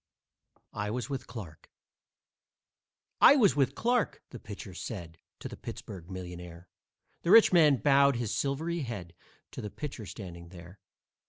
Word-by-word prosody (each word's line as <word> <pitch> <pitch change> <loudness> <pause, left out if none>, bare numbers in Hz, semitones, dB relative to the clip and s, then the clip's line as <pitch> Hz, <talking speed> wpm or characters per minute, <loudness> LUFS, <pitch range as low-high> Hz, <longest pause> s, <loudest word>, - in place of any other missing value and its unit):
I 105 -1 -3
WAS 125 +5 -4
WITH 135 -2 -4
CLARKE 90 -10 -10 1.5
"I 280 - +9
was 210 - +4
with 135 -2 +1
Clarke," 240 -1 0
the 125 - -8
pitcher 100 -2 -9
said 85 -4 -7 0.2
To - - -5
the - - -8
Pittsburg 90 -4 -9
millionaire. 90 -2 -8 0.5
The 170 - -3
rich 220 -1 +8
man 155 -5 +6
bowed 140 +3 +4
his 120 -3 -2
silvery 160 +5 -1
head 110 - -6 0.4
To - - -7
the 105 - -5
pitcher 130 -4 -7
standing 85 -3 -9
there. 90 +2 -13
110 Hz, 145 wpm, -30 LUFS, 90-140 Hz, 1.5 s, I